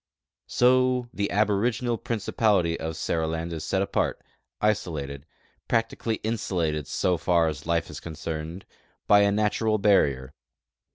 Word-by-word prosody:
So 125 0 +3
the 100 -1 -1
aboriginal 110 +4 +1
principality 100 -6 +1
of 80 0 -4
Seriland 80 +1 -2
is 80 -2 -5
set 95 0 0
apart, - - -1 0.4
isolated, 75 -9 -2 0.4
prac 115 -1 +2
tically 110 -2 -3
insulated 85 -9 -1
so 90 -1 +1
far 85 -1 +2
as 75 -2 -5
life 85 0 +1
is - - -8
concerned, 80 +2 -6 0.4
hy 105 - +7
a 100 0 +4
natural 110 +1 +1
barrier. 70 -10 +2
95 Hz, 125 wpm, -26 LUFS, 80-110 Hz, 0.4 s, hy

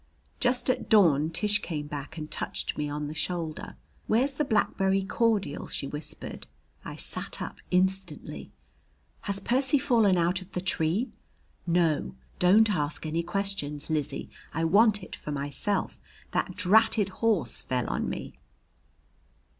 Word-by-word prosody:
Just 245 0 +2
at 255 - 0
dawn 160 -9 +5
Tish 210 +5 +1
came 150 -4 -4
back 145 +2 -7
and 155 -1 -6
touched - - -3
me 150 -1 -2
on 150 0 -3
the 150 - -5
shoulder. 160 - -4 0.3
"Where's 260 +6 +2
the 300 - 0
blackberry 195 -5 +2
cordial?" 205 -6 0
she - - -3
whispered 150 +2 -7 0.4
I - - -7
sat - - -4
up - - -5
instantly. 185 -3 -1 0.7
"Has 200 -1 -1
Percy 265 +7 +2
fallen 225 -8 +3
out 175 +2 +1
of 185 +1 -13
the - - -1
tree?" 185 +5 0 0.6
"No. 165 - +1 0.2
Don't 210 +5 +6
ask 150 -4 -1
any 160 +2 0
questions, 170 -5 -3
Lizzie. 150 -3 -2 0.2
I 160 - 0
want 205 +4 +4
it - - -8
for 150 - -7
myself. 145 +8 -1 0.3
That - - -1
dratted 205 +1 +4
horse 205 - +2
fell 125 -2 -1
on - - -1
me." - - -6
180 Hz, 140 wpm, -28 LUFS, 155-210 Hz, 0.7 s, Don't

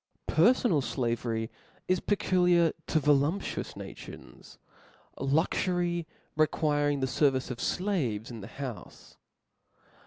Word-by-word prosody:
Per 170 +10 +5
fonal 215 - +1
flavery 115 -3 -2 0.4
is 185 -1 +2
peculiar 180 -4 +3 0.2
to 160 - +2
voluptuous 150 +6 +1
nations - - -11 0.3
\ - - -32
luxury 170 +4 0 0.3
requiring 145 -2 +1
the - - +2
fervice 130 -2 +1
of 120 - -6
flaves 130 - -1
in 115 -2 -7
the 100 - -8
houfc. 130 -1 -8
150 Hz, 105 wpm, -29 LUFS, 130-175 Hz, 0.4 s, Per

